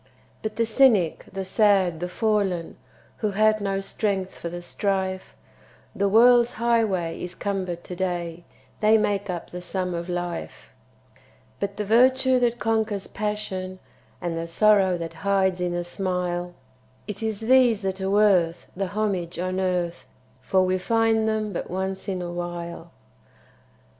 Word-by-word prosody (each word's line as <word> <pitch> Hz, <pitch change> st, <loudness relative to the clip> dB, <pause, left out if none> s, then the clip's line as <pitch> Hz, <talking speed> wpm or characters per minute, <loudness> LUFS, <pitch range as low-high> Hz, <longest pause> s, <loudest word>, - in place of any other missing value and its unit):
By 215 Hz, -, -2 dB
the 230 Hz, -, +1 dB
cynic, 220 Hz, -8 st, +3 dB
the 195 Hz, 0 st, -4 dB
sad, 190 Hz, -4 st, +3 dB
the 180 Hz, +1 st, -3 dB
fallen, 195 Hz, -4 st, 0 dB, 0.4 s
Who 215 Hz, -, -1 dB
had 215 Hz, +1 st, +3 dB
no 195 Hz, -1 st, -1 dB
strength 195 Hz, -1 st, -2 dB
for 170 Hz, -, -6 dB
the 175 Hz, +1 st, -7 dB
strife, 190 Hz, 0 st, -2 dB, 0.6 s
The 200 Hz, 0 st, +1 dB
world's 240 Hz, +3 st, +6 dB
highway 220 Hz, -8 st, 0 dB
is 180 Hz, 0 st, -6 dB
cumbered 185 Hz, -4 st, -3 dB
to 180 Hz, -, -7 dB
day 175 Hz, -2 st, -3 dB, 0.4 s
They 215 Hz, +1 st, +5 dB
make 205 Hz, -2 st, 0 dB
up 175 Hz, -2 st, -5 dB
the 180 Hz, -, -6 dB
sum 180 Hz, 0 st, -3 dB
of 170 Hz, +1 st, -4 dB
life; 175 Hz, -1 st, -5 dB, 0.9 s
But 200 Hz, 0 st, -3 dB
the 210 Hz, -, -2 dB
virtue 255 Hz, +4 st, +4 dB
that 240 Hz, -1 st, +1 dB
conquers 220 Hz, -3 st, 0 dB
passion, 200 Hz, -3 st, -4 dB, 0.4 s
And 175 Hz, -2 st, -3 dB
the 165 Hz, 0 st, -3 dB
sorrow 195 Hz, 0 st, +4 dB
that 165 Hz, -1 st, -6 dB
hides 190 Hz, -2 st, +1 dB
in 175 Hz, -1 st, -1 dB
a 175 Hz, -, -1 dB
smile 180 Hz, -1 st, -3 dB, 0.5 s
It 210 Hz, -1 st, -6 dB
is 220 Hz, -2 st, -2 dB
these 240 Hz, -2 st, +4 dB
that 190 Hz, 0 st, -2 dB
are 190 Hz, -, -1 dB
worth 190 Hz, -5 st, +3 dB
the 195 Hz, +1 st, -2 dB
homage 190 Hz, -4 st, -2 dB
on 185 Hz, +1 st, -2 dB
earth, 180 Hz, -2 st, -1 dB, 0.3 s
For 185 Hz, +8 st, +2 dB
we 185 Hz, 0 st, +1 dB
find 225 Hz, +1 st, +2 dB
them 215 Hz, -1 st, -1 dB
but -, -, -4 dB
once 190 Hz, +1 st, -3 dB
in 185 Hz, -2 st, -2 dB
a 175 Hz, -, -5 dB
while. 175 Hz, -1 st, -6 dB
190 Hz, 155 wpm, -25 LUFS, 175-215 Hz, 0.9 s, world's